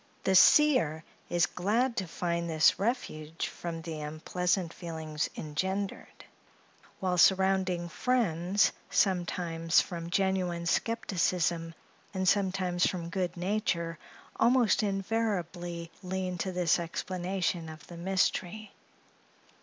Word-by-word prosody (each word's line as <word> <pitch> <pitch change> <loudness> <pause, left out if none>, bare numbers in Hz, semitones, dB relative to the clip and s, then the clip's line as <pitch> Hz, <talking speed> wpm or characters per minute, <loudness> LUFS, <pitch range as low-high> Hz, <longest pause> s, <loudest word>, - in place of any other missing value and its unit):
The 190 - +2
seer 185 - +5 0.3
is 175 -1 +3
glad 230 +7 0
to 190 - -1
find 170 0 -2
this 160 +1 +4
refuge 165 -8 -2
from 165 -1 -6
the 160 -1 -5
unpleasant 175 +4 -1
feelings 160 -3 -4
engendered; 190 +6 -4 0.7
while 180 -2 0
surrounding 190 -2 +3
friends, 195 -3 +1 0.2
sometimes 175 -3 +1
from 170 -2 -3
genuine 180 -2 0
skepticism, 175 -5 0 0.4
and 185 0 -1
sometimes 185 -2 +2
from 170 -2 -4
good 185 -2 -2
nature, 175 -4 -1 0.4
almost 240 -3 +4
invariably 185 -5 -2
lean 185 -1 -3
to 190 - -2
this 180 -2 +2
explanation 175 0 -2
of 155 0 -11
the 175 - -11
mystery. 190 +3 -1
180 Hz, 105 wpm, -30 LUFS, 170-195 Hz, 0.7 s, seer